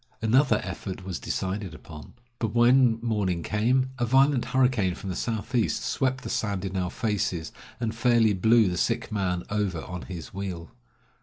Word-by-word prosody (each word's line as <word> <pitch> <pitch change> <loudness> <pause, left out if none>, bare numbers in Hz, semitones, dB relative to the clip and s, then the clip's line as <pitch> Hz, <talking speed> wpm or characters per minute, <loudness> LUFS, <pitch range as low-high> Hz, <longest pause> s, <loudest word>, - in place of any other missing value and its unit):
Another 115 +1 +3
effort 95 0 -6
was 95 -2 -4
decided 95 -3 -3
upon. 75 -1 -12 0.2
But 110 -1 -2
when 120 0 +5
morning 100 -7 0
came, 125 +5 +1
a 120 - +2
violent 135 +1 +4
hurricane 125 -9 +2
from 95 - -6
the - - -4
southeast 115 +2 -1
swept 130 -1 -1
the - - -6
sand 100 -3 -1
in 95 0 -4
our 90 -1 -1
faces, 95 -7 -2 0.3
and 115 -2 -2
fairly 115 -2 +3
blew 110 +3 +4
the 90 -1 -2
sick 115 0 -1
man 90 -4 -1
over 100 -6 -1
on 90 -1 -6
his 85 -3 -8
wheel. 95 -4 -5
105 Hz, 165 wpm, -26 LUFS, 95-120 Hz, 0.3 s, when